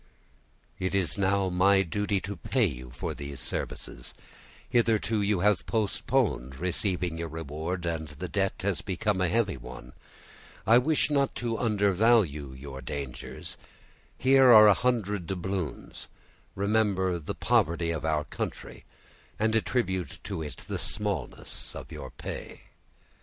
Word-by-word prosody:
"It 95 +1 -1
is 95 0 +1
now 95 0 +2
my 95 +2 +4
duty 100 +3 -1
to 100 +3 -5
pay 120 +6 +1
you 65 -7 -4
for - - -4
these 70 -1 -7
services; 65 - -5 0.5
hitherto 115 -2 +2
you 100 -3 +1
have 105 -1 +2
postponed 105 - 0
receiving 90 0 -1
your 85 - -2
reward, 80 +3 -4
and 80 -2 -2
the 75 +5 -6
debt 95 +2 0
has 100 -2 0
become 95 0 -1
a 90 - +2
heavy 105 -5 +1
one—I 60 - -2
wish 150 +2 +1
not 140 -2 +2
to 115 -2 -2
undervalue 100 - +3
your 65 0 -8
dangers; 70 0 -6 0.6
here 130 -1 +6
are 110 -2 +10
a 105 - +8
hundred 105 -7 0
doubloons; 95 -4 -4 0.5
remember 100 -3 +1
the 75 - -5
poverty 85 +1 +2
of 80 - -3
our 80 -1 +1
country, - - -6 0.5
and 110 +1 +1
attribute 95 - 0
to 95 -4 -4
it 75 -2 -6
the - - -3
smallness - - -4
of - - -8
your - - -7
pay." - - -7
95 Hz, 135 wpm, -28 LUFS, 80-105 Hz, 0.6 s, are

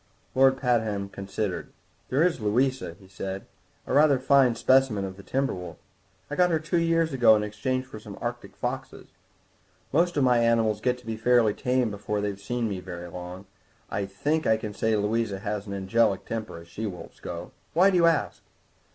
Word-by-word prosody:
Lord 135 0 +5
Pabham 110 -6 0
considered. 100 -1 -4 0.4
"There 140 +5 +3
is 180 -5 +2
Louisa," 125 -3 0
he 95 - -16
said, 95 0 -6 0.4
"a - - -3
rather 145 0 +5
fine 130 -2 +4
specimen 130 -5 +3
of 95 -1 -6
the 100 - -11
timber 135 +6 -1
wolf. 90 -2 -7 0.5
I 145 - -4
got 180 +2 +4
her 165 - +2
two 155 +2 0
years 165 -2 +2
ago 120 -4 +6
in 105 - 0
exchange 130 +5 -2
for 120 -4 -10
some 105 -2 -10
Arctic - - -5
foxes. - - -5 0.8
Most 170 +2 +2
of 140 - +3
my 125 -2 +4
animals 115 -2 +2
get 125 +1 +1
to 125 - -18
be 110 -1 -4
fairly 115 -2 +4
tame 125 -1 0
before 105 +1 -3
they've 100 -1 -4
been 120 0 -1
with - - +2
me 95 - -3
very 90 -1 -7
long; 90 +2 -8 0.5
I 100 0 -2
think 150 +11 -1
I 110 - +4
can 105 -1 -6
say 110 +2 +1
Louisa 105 0 0
has 105 +1 -4
an 100 - -5
angelic 100 +1 +1
temper, 110 -6 -5
as 85 0 -12
she 105 +6 -4
wolves 90 -3 -9
go. - - -7 0.2
Why 190 +4 +6
do 185 - +2
you 170 -1 +5
ask?" 165 -2 +1
110 Hz, 195 wpm, -26 LUFS, 100-130 Hz, 0.8 s, ago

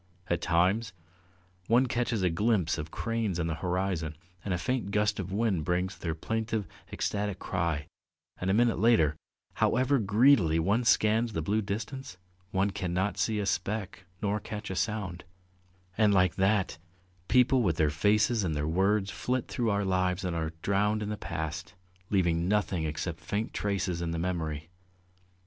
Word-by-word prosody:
At 85 -1 +1
times 95 +7 +2 0.7
one 120 +3 +4
catches 120 -4 -1
a 90 - +3
glimpse 95 -3 +1
of 75 +1 -5
cranes 115 -3 -2
on 85 - 0
the 85 - -1
horizon, 90 -4 -1 0.3
and 100 - -3
a 90 - +1
faint 125 +2 -1
gust 105 0 +1
of 95 -1 -4
wind 100 -5 +1
brings 90 +3 -1
their 85 -2 -3
plaintive, 110 +4 -2 0.3
ecstatic 105 -1 -2
cry, 85 -7 -2 0.5
and 90 - -1
a - - +3
minute 120 0 +3
later, 105 -10 +4 0.5
however 130 +3 +3
greedily 105 - +4
one 100 +9 +1
scans 110 +1 +3
the 80 - -2
blue 105 +6 +1
distance, 110 +2 -5 0.3
one 100 +1 +1
cannot 95 0 -1
see 110 -1 +1
a 105 - -1
speck 100 -2 -2 0.2
nor 105 +1 +1
catch 105 0 -6
a - - -3
sound; 100 -5 -2 0.8
and 105 -2 +5
like 90 -3 +4
that, 95 -3 +1 0.5
people 125 +1 +4
with 90 -8 +1
their 75 -3 +3
faces 105 +7 +2
and 80 -4 -1
their 75 +1 -1
words 95 +4 +1
flit 125 -1 -2
through 120 -3 -1
our 100 -1 +1
lives 95 0 0
and 90 -2 -2
are 80 -1 -2
drowned 105 +2 +1
in 105 - -4
the 105 - -2
past, 80 -1 -5 0.3
leaving 85 -3 +2
nothing 95 -5 +1
except 80 +2 -3
faint 100 +8 -3
traces 95 -4 -1
in 85 - -2
the 85 - -2
memory. 80 -2 -3
95 Hz, 165 wpm, -29 LUFS, 85-110 Hz, 0.8 s, and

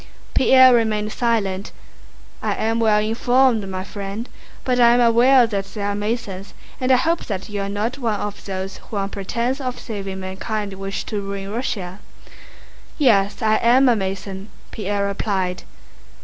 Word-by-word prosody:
Pierre 260 -1 +7
remained 215 -2 +1
silent. 210 -5 -1 0.7
"I - - -1
am 225 +1 0
well 215 -2 +4
informed, 230 0 +2
my 185 0 -4
friend, 200 +3 -6 0.4
but 250 -1 0
I 235 0 +6
am - - +3
aware 240 +2 +5
that 200 -4 -2
there 205 -1 -3
are 205 - 0
Masons 205 -2 -4 0.2
and 255 0 +1
I - - +7
hope 330 +6 0
that 195 0 -5
you 205 -1 -3
are 195 - -3
not 220 +6 -2
one 225 -5 -1
of 205 0 -5
those 190 0 -5
who 215 - -8
on 195 0 -1
pretense 235 +7 -2
of 255 -1 -4
saving 195 -4 -6
mankind 200 +2 -4
wish 195 +1 -4
to 210 -2 -4
ruin 195 0 -5
Russia." 200 -5 -4 1.0
"Yes, 210 -8 +2
I 215 0 +3
am 250 +4 +4
a 245 - +5
Mason," 195 0 -4 0.2
Pierre 205 -1 -2
replied. 190 -2 -2
210 Hz, 165 wpm, -21 LUFS, 195-235 Hz, 1.0 s, Pierre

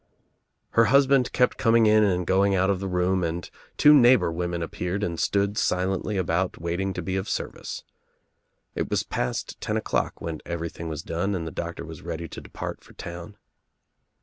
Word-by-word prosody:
Her 115 - +5
husband 135 +1 +4
kept 125 -1 +2
com 115 -2 +3
ing 115 -1 +6
in 110 0 +5
and 90 -3 +1
going 100 +2 +3
out 95 +1 +3
of 95 - -1
the 100 - -3
room 90 0 +1
and 85 +1 -3 0.3
two 150 - +7
neighbor 125 - +6
women 85 0 -2
appeared 90 +4 -3
and 85 -5 -2
stood 100 +1 +1
silently 95 +3 0
about 90 0 0
waiting 85 +4 -2
to 90 - -4
be 95 +2 -2
of 95 +2 -3
service. - - -4 0.9
It - - -3
was - - +1
past 60 - -3
ten - - -1
o'clock - - -1
when 80 -2 -5
everything 85 -1 -5
was 80 0 -5
done 90 +5 -1
and 85 -3 -3
the 80 - -5
doctor 85 0 -5
was 80 -1 -9
ready 85 0 -5
to - - -8
depart - - -7
for - - -17
town. 85 +3 -8
90 Hz, 185 wpm, -25 LUFS, 85-100 Hz, 0.9 s, two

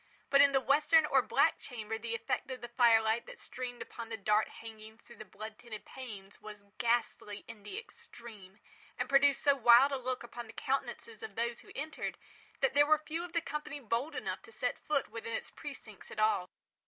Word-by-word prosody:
But 280 0 +7
in 280 0 +7
the 270 - +4
western 300 +4 +4
or - - +4
black - - +3
chamber 225 -3 -5
the 230 0 -3
effect 255 +3 -2
of 260 -1 -5
the 240 - -5
fire 235 -2 +5
light 220 +2 0
that - - -10
streamed 250 -1 -6
upon 230 -1 -8
the 225 - -4
dark 210 +1 +2
hangings 220 0 -12
through 235 - -14
the 215 - -9
blood 215 +1 -9
tinted 235 -3 -9
panes, 205 -7 -10
was 210 -1 -10
ghastly 230 -3 0
in 230 -2 -10
the 210 - -7
extreme, 215 - -11 0.4
and - - -1
produced 280 0 +4
so 285 - +6
wild 245 +2 +7
a 275 - 0
look 255 -1 -3
upon 240 0 -8
the 225 - -11
countenances 275 - -3
of 440 - -7
those 235 +1 -1
who - - -14
entered, 310 +3 -4 0.4
that 270 - +3
there 290 +1 +5
were 310 0 +6
few 315 +2 -4
of 350 -1 -8
the 335 - +2
company 300 -1 -5
bold 245 +5 -2
enough - - -3
to - - -15
set - - -2
foot 295 -2 0
within 230 0 -5
its - - -4
precincts 250 - -10
at - - -10
all. 215 -4 +2
240 Hz, 210 wpm, -33 LUFS, 220-280 Hz, 0.4 s, But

